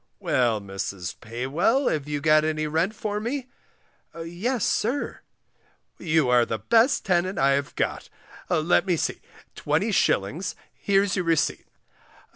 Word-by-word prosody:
"Well, 120 -4 +1
Mrs. 95 -2 -5
Paywell, 145 - 0
have 150 -2 -2
you 145 -1 -3
got 155 0 +4
any 155 0 -1
rent 165 +7 0
for 210 -1 -3
me? 250 +4 -3 0.7
Yes, 185 +8 -2
sir. 250 +6 -1 0.8
You 160 -4 +2
are 125 -1 +5
the 115 -1 -2
best 230 - +3
tenant 185 +1 +1
I 135 +1 +3
have 140 +1 -1
got; - - -2 0.4
let 175 +4 +2
me 180 - +3
see, - - -2 0.3
20s., 155 - 0 0.2
here's 200 -1 +1
your 180 -3 -1
receipt. 160 -2 0
160 Hz, 130 wpm, -25 LUFS, 135-200 Hz, 0.8 s, are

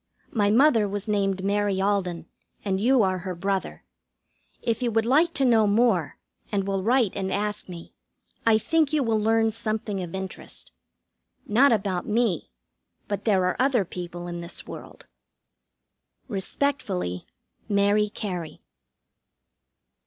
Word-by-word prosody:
My 205 -3 +2
mother 230 -2 +4
was 205 +1 -4
named 195 -2 0
Mary 200 -1 +1
Alden, 190 -4 0 0.4
and 190 -1 0
you 250 0 +4
are 185 -1 0
her 185 0 -5
brother. 195 +2 -3 0.8
If 230 +1 -1
you 245 - +1
would 225 0 +1
like 305 +8 +4
to 275 - +2
know 225 -4 +4
more, 205 -7 +2 0.3
and 200 -2 0
will 195 -1 -1
write 235 0 +2
and 190 -1 -2
ask 210 0 -2
me, 170 -2 -10 0.5
I 225 -1 +5
think 315 +6 +1
you 300 -3 +2
will 225 -2 +1
learn 225 +1 +2
something 215 -3 -3
of 175 0 -6
interest. 190 -1 -7 0.7
Not 245 +6 +4
about 195 -5 0
me, 215 - 0 0.6
but 205 - -4
there 195 -4 +3
are 180 - +1
other 255 -6 +2
people 175 0 -7
in 175 0 -5
this 170 - -8
world. - - -10 1.2
Respectfully, 195 - -2 0.4
MARY 205 +1 +3
CARY. 180 -7 -5
205 Hz, 140 wpm, -25 LUFS, 190-225 Hz, 1.2 s, I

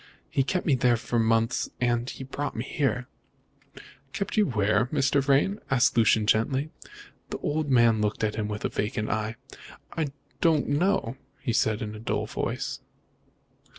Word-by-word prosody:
He - - +2
kept 180 +7 -1
me 150 - +3
there 125 -2 +3
for 120 +1 -1
months, 115 0 +1
and 120 -1 +1
then - - -5
he - - -7
brought 140 +2 -4
me 115 - -2
here." 130 -4 -1 1.1
"Kept 200 - -3
you 210 -1 +4
where, 110 -1 +2
Mr. 140 0 +2
Vrain?" 140 +10 +2
asked 130 0 +3
Lucian 110 -2 +4
gently. 130 +8 +1 0.6
The - - -3
old 150 0 -1
man 115 -4 +4
looked 105 +1 -1
at 105 -1 +1
him 105 -1 -2
with 105 0 -4
a - - +1
vacant 105 +1 -2
eye. 110 +1 -2 0.6
"I 160 -3 0 0.3
don't 160 -3 +3
know," 145 - +1 0.2
he 120 - -2
said 110 0 +1
in 105 0 -5
a 105 - -8
dull 105 -1 -1
voice. - - -3
120 Hz, 170 wpm, -27 LUFS, 110-140 Hz, 1.1 s, you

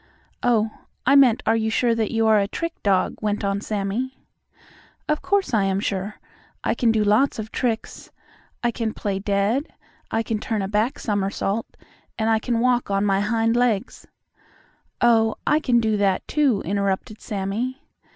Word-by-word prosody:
"Oh, 225 -3 +2 0.3
I 275 +3 +5
meant 255 -5 +5
are 225 - +3
you 220 -1 0
sure 235 +1 +2
that 225 -2 0
you 225 -1 +1
are 220 -1 +5
a 200 - +1
trick 335 +10 -4
dog," 195 -2 +1
went 210 -1 -1
on 200 0 -1
Sammie. 215 +6 -3 0.9
"Of 300 0 0
course, 395 -7 0
I 205 -3 +3
am 195 0 0
sure. 200 +1 -3 0.5
I - - +1
can 235 -2 +2
do 220 -1 +2
lots 215 +7 +3
of 220 0 -6
tricks. 230 -3 -3 0.5
I 240 - +2
can 225 -2 -3
play 195 -2 -2
dead. 205 - 0 0.4
I 225 - 0
can 225 -1 -2
turn 215 -2 -2
a - - -2
back 215 +5 0
somersault, 200 +1 -1 0.5
and 220 -1 +1
I 220 - +3
can 230 0 -1
walk 250 -2 +2
on 200 0 +1
my 195 -1 +2
hind 225 +2 +1
legs 240 -2 0 0.5
" - - -35
"Oh, 225 -2 +4
I 300 - +3
can 250 -6 +2
do 220 -2 +1
that, 195 -2 +1
too," 275 -9 +2
interrupted 200 +3 -2
Sammie. 215 +7 -3
220 Hz, 175 wpm, -23 LUFS, 200-240 Hz, 0.9 s, I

